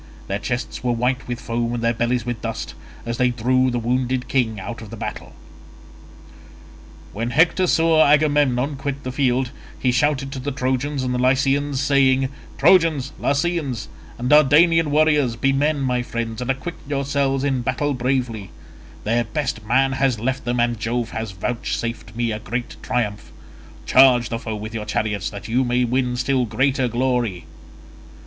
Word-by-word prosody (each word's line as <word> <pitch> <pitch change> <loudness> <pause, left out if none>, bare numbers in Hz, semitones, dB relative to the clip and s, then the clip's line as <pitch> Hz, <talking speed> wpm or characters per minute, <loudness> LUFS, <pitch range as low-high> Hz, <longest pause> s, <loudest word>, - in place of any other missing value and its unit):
Their 100 +1 -3
chests 120 +5 -4
were 125 -1 +1
white 125 +2 -1
with 120 -1 -4
foam 120 0 -2
and 120 - -4
their 115 0 +2
bellies 120 0 -1
with 120 -1 -4
dust, 115 -1 -4 0.3
as 115 0 -3
they 125 -1 +3
drew 130 +2 +1
the 120 - -1
wounded 125 +2 -1
king 115 -6 0
out 115 +5 -7
of 110 - -10
the 115 - -8
battle. - - -6 1.8
When 115 +3 -2
Hector 165 +7 +3
saw 165 -1 +4
Agamemnon 145 -2 +2
quit 140 0 -4
the 130 - -4
field, 130 -1 0 0.3
he 130 - +1
shouted 135 +1 +1
to 135 - -5
the 140 +3 -3
Trojans 130 +2 -1
and 125 -1 -1
Lycians 135 +2 +2
saying, 135 -2 +3 0.3
"Trojans, 155 -4 +3
Lycians, 145 -4 -1 0.3
and 120 - -3
Dardanian 150 +3 +5
warriors, 150 -5 +3
be 135 +4 +1
men, 145 +2 +1
my 125 -2 0
friends, 115 -1 -4
and 125 - -4
acquit 135 +6 -2 0.2
yourselves 140 -1 0
in 135 -3 0
battle 130 +4 -1
bravely; 125 -6 -2 0.5
their 120 +3 +1
best 110 0 -3
man 135 +3 +3
has 135 -3 +1
left 130 +4 -2
them, 120 0 -1
and 120 -1 +1
Jove 120 +2 -2
has 110 -1 -4
vouchsafed 115 +2 -4
me 120 -1 -1
a 105 - -3
great 120 +2 -4
triumph; 105 -3 -2 0.5
charge 125 -3 +5
the 115 - -3
foe 110 -2 -5
with 105 +1 -7
your 110 -2 -4
chariots 105 -1 -1
that 100 0 -8
you 125 +4 +1
may 125 0 +1
win 125 0 0
still 130 0 +1
greater 130 +3 +1
glory." 120 -6 -1
125 Hz, 165 wpm, -21 LUFS, 120-140 Hz, 1.8 s, Dardanian